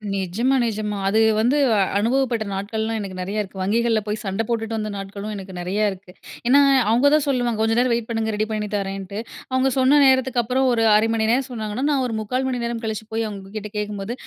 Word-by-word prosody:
நிஜமா 200 Hz, +8 st, 0 dB
நிஜமா 210 Hz, -2 st, -2 dB
அது 210 Hz, +3 st, +2 dB, 0.2 s
வந்து 245 Hz, +6 st, +2 dB, 0.4 s
அனுபவப்பட்ட 240 Hz, 0 st, +1 dB
நாட்கள்லாம் 220 Hz, +3 st, -2 dB
எனக்கு 195 Hz, -3 st, -6 dB
நிறையா 195 Hz, +4 st, -3 dB
இருக்கு 195 Hz, -1 st, -9 dB
வங்கிகள்ல 225 Hz, +3 st, +1 dB
போய் 210 Hz, +1 st, -1 dB
சண்ட 195 Hz, +1 st, -2 dB
போட்டுட்டு 225 Hz, -1 st, -2 dB
வந்த 215 Hz, -1 st, -3 dB
நாட்களும் 200 Hz, +2 st, -6 dB
எனக்கு 190 Hz, -1 st, -8 dB
நெறையா 190 Hz, +4 st, -1 dB
இருக்கு. 185 Hz, -1 st, -12 dB, 0.4 s
ஏன்னா, 270 Hz, +3 st, +6 dB, 0.3 s
அவுங்க 240 Hz, +5 st, +4 dB
தான் 305 Hz, -1 st, +4 dB
சொல்லுவாங்க 245 Hz, -5 st, 0 dB
கொஞ்சம் 225 Hz, +1 st, +2 dB
நேரம் 250 Hz, 0 st, +2 dB
வெயிட் 235 Hz, -1 st, -2 dB
பண்ணுங்க. 225 Hz, -1 st, -1 dB
ரெடி 215 Hz, +1 st, 0 dB
பண்ணி 210 Hz, -1 st, -2 dB
தரேன்ட்டு, 195 Hz, 0 st, -4 dB, 0.3 s
அவுங்க 260 Hz, +1 st, +2 dB
சொன்ன 265 Hz, +3 st, +5 dB
நேரத்துக்கு 260 Hz, -2 st, +3 dB
அப்புறம் 255 Hz, +4 st, +1 dB
ஒரு 230 Hz, -2 st, +2 dB
1/2 215 Hz, +1 st, +3 dB
மணி 220 Hz, -1 st, +1 dB
நேரம் 260 Hz, +2 st, +1 dB
சொன்னாங்கன்னா, 220 Hz, 0 st, -4 dB
நான் 275 Hz, -2 st, +1 dB
ஒரு 235 Hz, -, -4 dB
3/4 250 Hz, +5 st, -2 dB
மணி 250 Hz, -2 st, -2 dB
நேரம் 235 Hz, -1 st, -3 dB
கழிச்சு 220 Hz, -1 st, -4 dB
போய் 225 Hz, +1 st, 0 dB
அவுங்ககிட்ட 205 Hz, +1 st, -7 dB
கேக்கும்போது, 210 Hz, +1 st, -3 dB
220 Hz, 200 wpm, -22 LUFS, 205-245 Hz, 0.4 s, ஏன்னா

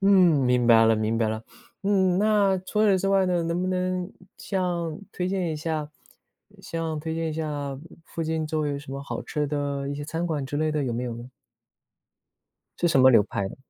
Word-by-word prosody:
嗯， 195 Hz, 0 st, +4 dB, 0.3 s
明 125 Hz, -1 st, +2 dB
白 115 Hz, -1 st, +7 dB
了 115 Hz, 0 st, +5 dB
明 110 Hz, +1 st, 0 dB
白 115 Hz, -1 st, +1 dB
了。 110 Hz, 0 st, -3 dB, 0.4 s
嗯， 190 Hz, -2 st, +2 dB
那 205 Hz, -2 st, +3 dB
除 210 Hz, +3 st, -1 dB
此 200 Hz, -3 st, +4 dB
之 195 Hz, +1 st, -1 dB
外 195 Hz, -1 st, +4 dB
呢， 175 Hz, -2 st, +1 dB
能 170 Hz, +2 st, -1 dB
不 185 Hz, -, -1 dB
能 185 Hz, 0 st, -1 dB, 0.3 s
像 175 Hz, -4 st, -2 dB
推 180 Hz, 0 st, -2 dB
荐 185 Hz, -3 st, -1 dB
一 -, -, -4 dB
下， 155 Hz, -1 st, -3 dB, 0.7 s
像 165 Hz, -2 st, -3 dB
推 160 Hz, +1 st, -4 dB
荐 165 Hz, 0 st, -2 dB
一 -, -, -4 dB
下 145 Hz, -3 st, -4 dB, 0.3 s
附 165 Hz, -, -5 dB
近 160 Hz, 0 st, -1 dB
周 155 Hz, 0 st, -1 dB
围 150 Hz, -, 0 dB
有 140 Hz, -, -3 dB
什 140 Hz, -1 st, -11 dB
么 140 Hz, 0 st, -5 dB
好 -, -, -5 dB
吃 150 Hz, -1 st, -2 dB
的 140 Hz, -1 st, -2 dB
一 140 Hz, -, -3 dB
些 145 Hz, -, -5 dB
餐 165 Hz, +3 st, -3 dB
馆 150 Hz, -5 st, -2 dB
之 140 Hz, +2 st, -4 dB
类 155 Hz, +1 st, +1 dB
的， 150 Hz, -2 st, -1 dB
有 125 Hz, -, -2 dB
没 120 Hz, +2 st, -2 dB
有 120 Hz, -2 st, -4 dB
呢？ 120 Hz, +2 st, -10 dB, 1.5 s
是 175 Hz, -, +2 dB
什 135 Hz, -, +4 dB
么 130 Hz, 0 st, +8 dB
流 115 Hz, -, +6 dB
派 100 Hz, -1 st, -3 dB
的？ -, -, -11 dB
155 Hz, 235 characters per minute, -25 LUFS, 140-180 Hz, 1.5 s, 么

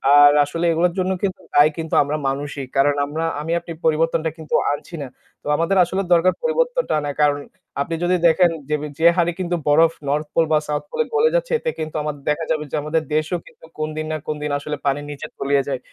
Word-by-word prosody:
আর 145 Hz, 0 st, +8 dB
আসলে 165 Hz, +4 st, -3 dB
এগুলোর 170 Hz, +2 st, +2 dB
জন্য 185 Hz, 0 st, 0 dB
কিন্তু 190 Hz, -1 st, -1 dB
দায়ী 145 Hz, +2 st, +6 dB
কিন্তু 160 Hz, -1 st, -3 dB
আমরা 145 Hz, +2 st, -2 dB
মানুষই। 140 Hz, 0 st, -3 dB
কারণ 140 Hz, +1 st, +3 dB
আমরা 155 Hz, +3 st, -4 dB, 0.2 s
আমি 160 Hz, +2 st, -4 dB
আপনি 170 Hz, -, -10 dB
পরিবর্তনটা 160 Hz, +1 st, +2 dB
কিন্তু 160 Hz, -2 st, -3 dB, 0.2 s
আনছি 145 Hz, +4 st, -5 dB
না। 140 Hz, -, -5 dB, 0.4 s
তো -, -, -9 dB
আমাদের 170 Hz, +5 st, +1 dB
আসলে 185 Hz, +3 st, -1 dB
দরকার 175 Hz, +2 st, +4 dB
পরিবর্তনটা -, -, 0 dB
আনা। 145 Hz, -1 st, -3 dB
কারণ 145 Hz, -1 st, +3 dB, 0.4 s
আপনি 165 Hz, +4 st, -2 dB
যদি 180 Hz, +1 st, +2 dB
দেখেন 175 Hz, +1 st, +4 dB, 0.2 s
যেবি 150 Hz, 0 st, -1 dB
যে 165 Hz, -, +6 dB
হারে 175 Hz, -1 st, +2 dB
কিন্তু 175 Hz, -1 st, -1 dB
বরফ 160 Hz, +3 st, +5 dB, 0.2 s
north 150 Hz, +2 st, 0 dB
pole 165 Hz, -1 st, +3 dB
বা 155 Hz, -, +5 dB
south 150 Hz, 0 st, -2 dB
pole 475 Hz, -, -1 dB
এ -, -, -11 dB
গলে 455 Hz, +2 st, +4 dB
যাচ্ছে -, -, 0 dB
এতে 485 Hz, -, -2 dB
কিন্তু 155 Hz, 0 st, -5 dB
আমার 150 Hz, -1 st, -3 dB
দেখা 150 Hz, +2 st, 0 dB
যাবে 155 Hz, -1 st, 0 dB
যে -, -, -2 dB
আমাদের 155 Hz, +1 st, 0 dB
দেশও 155 Hz, +3 st, 0 dB
কিন্তু -, -, -17 dB
কোন 155 Hz, 0 st, -2 dB
দিন 155 Hz, -, -2 dB
না -, -, -1 dB
কোন 155 Hz, -, -1 dB
দিন 150 Hz, -, -2 dB
আসলে 150 Hz, +1 st, -5 dB
পানির 145 Hz, +1 st, 0 dB
নিচে 145 Hz, -, -7 dB
তলিয়ে 140 Hz, 0 st, +1 dB
যায়। 135 Hz, -2 st, -2 dB
155 Hz, 220 wpm, -21 LUFS, 145-175 Hz, 0.4 s, আর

